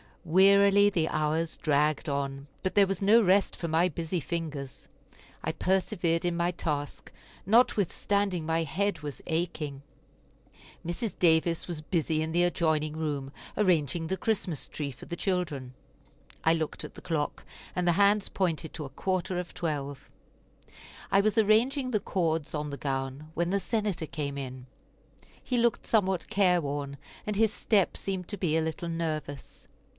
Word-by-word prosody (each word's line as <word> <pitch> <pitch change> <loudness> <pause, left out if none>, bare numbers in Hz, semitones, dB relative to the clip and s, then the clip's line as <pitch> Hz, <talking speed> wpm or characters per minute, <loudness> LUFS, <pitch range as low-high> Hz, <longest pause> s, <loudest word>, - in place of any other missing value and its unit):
Wearily 200 +3 +6
the 170 -5 +1
hours 155 +2 0
dragged 150 +1 +1
on, 140 0 -3 0.2
but 185 - -1
there 200 -1 +6
was 195 -1 -2
no 215 +4 +6
rest 195 +1 +3
for 170 - -4
my 165 +2 +3
busy 170 +2 -2
fingers. 150 -4 -5 0.6
I - - 0
persevered 180 -3 0
in 175 -1 0
my 175 +1 +1
task, 145 -4 -4 0.3
notwithstanding 200 -4 +2
my 165 +1 +1
head 200 +4 -1
was 145 -2 -6
aching. 160 -4 -2 1.0
Mrs. 175 +6 -3
Davis 165 -1 +3
was 170 -4 -4
busy 155 -1 0
in 160 0 -2
the 175 +1 +4
adjoining 155 -3 +1
room, 145 -4 -3 0.3
arranging 165 -5 +2
the 190 - -1
Christmas 190 -6 -1
tree 145 -2 -4
for 130 - -12
the 170 - -5
children. 165 -9 -2 0.7
I 160 - +5
looked 160 -2 -3
at - - -9
the - - -10
clock, 160 -4 -2 0.3
and 180 -1 0
the 175 - +5
hands 200 +2 +3
pointed 165 -4 -1
to 155 - -5
a - - -7
quarter 185 +2 -2
of 180 -2 -6
twelve. 145 -5 -4 1.0
I 195 0 +5
was 215 +2 +1
arranging 245 +5 +3
the 215 - +2
cords 165 -6 -1
on 150 -1 -2
the 140 - -5
gown 135 +2 -3
when 170 +2 0
the 200 - +2
Senator 205 -4 -1
came 140 -2 -4
in; 130 -2 -6 0.8
he 250 - -1
looked 235 0 +1
somewhat 190 -5 +1
careworn, 145 -8 +1 0.3
and 210 - -2
his 220 0 +3
step 205 -4 +2
seemed 190 -2 -3
to 205 - -3
be 165 -4 +1
a - - +2
little 160 +2 -3
nervous. 155 -4 -4
170 Hz, 160 wpm, -29 LUFS, 150-195 Hz, 1.0 s, Wearily